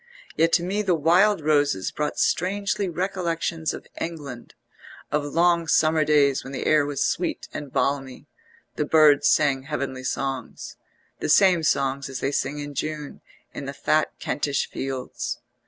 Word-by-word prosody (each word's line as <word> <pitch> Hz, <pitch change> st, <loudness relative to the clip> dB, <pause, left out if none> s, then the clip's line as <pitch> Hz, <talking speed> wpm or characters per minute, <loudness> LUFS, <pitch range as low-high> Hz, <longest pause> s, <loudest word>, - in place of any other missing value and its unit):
Yet 165 Hz, +1 st, +3 dB
to 175 Hz, -, +4 dB
me 195 Hz, +4 st, -1 dB
the 190 Hz, -4 st, +1 dB
wild 175 Hz, +5 st, +3 dB
roses 145 Hz, -9 st, +1 dB
brought 150 Hz, 0 st, -3 dB
strangely 200 Hz, +2 st, 0 dB
recollections 170 Hz, -2 st, -2 dB
of -, -, -8 dB
England, 145 Hz, -8 st, -7 dB, 0.6 s
of 150 Hz, 0 st, +1 dB
long 170 Hz, +2 st, +2 dB
summer 155 Hz, 0 st, +3 dB
days 145 Hz, -3 st, +3 dB
when 135 Hz, -, -9 dB
the -, -, -4 dB
air 150 Hz, -2 st, +3 dB
was 145 Hz, -2 st, -1 dB
sweet -, -, -2 dB
and 145 Hz, -3 st, -6 dB
balmy; 135 Hz, -2 st, -2 dB, 0.5 s
the 150 Hz, -, 0 dB
birds 150 Hz, -2 st, +5 dB
sang 140 Hz, -3 st, +3 dB
heavenly 135 Hz, -2 st, -4 dB
songs, 135 Hz, 0 st, -4 dB, 0.4 s
the -, -, -3 dB
same 185 Hz, -4 st, +5 dB
songs 140 Hz, -2 st, 0 dB
as 130 Hz, -1 st, -5 dB
they 135 Hz, -, -1 dB
sing 145 Hz, +1 st, -2 dB
in 145 Hz, 0 st, -6 dB
June 150 Hz, +1 st, -5 dB, 0.3 s
in -, -, -6 dB
the -, -, -5 dB
fat -, -, +1 dB
Kentish 140 Hz, -1 st, -1 dB
fields. 135 Hz, -1 st, -4 dB
150 Hz, 155 wpm, -24 LUFS, 140-165 Hz, 0.6 s, birds